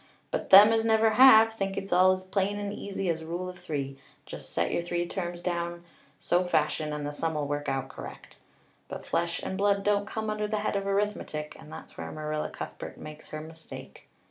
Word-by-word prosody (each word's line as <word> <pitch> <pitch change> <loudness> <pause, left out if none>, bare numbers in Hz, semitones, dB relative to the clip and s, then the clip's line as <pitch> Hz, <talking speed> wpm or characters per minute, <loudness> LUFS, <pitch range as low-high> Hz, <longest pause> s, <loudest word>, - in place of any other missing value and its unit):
But - - -3
them 205 +3 +9
as 225 0 +2
never 220 0 +4
have 225 -2 +8
think 195 -2 -3
it's 195 -1 -3
all 185 +1 +6
as 185 0 -2
plain 195 +2 -1
and 205 0 -4
easy 195 -2 -4
as 165 -1 -1
Rule 175 +3 -4
of 180 -1 -8
Three 140 -6 -4 0.3
just - - -9
set 85 +1 0
your - - 0
three 175 0 -2
terms 175 -1 -4
down 170 -1 -3 0.3
so 175 +1 +1
fashion, 155 -3 0
and 150 -1 -4
the 145 - -3
sum 160 +1 -2
'll 150 - -1
work 145 0 -2
out 135 0 -2
correct. - - -11 0.5
But - - -7
flesh 170 0 -1
and 190 - -4
blood 200 0 +2
don't 205 0 +1
come 220 -1 -3
under 210 0 -2
the 215 +1 -1
head 210 - -1
of 195 0 -1
arithmetic 195 -7 -2
and 155 -1 -13
that's - - -10
where - - -5
Marilla 155 0 -3
Cuthbert - - -8
makes 155 0 -10
her 155 - -6
mistake. 160 +1 -11
180 Hz, 210 wpm, -28 LUFS, 155-205 Hz, 0.5 s, them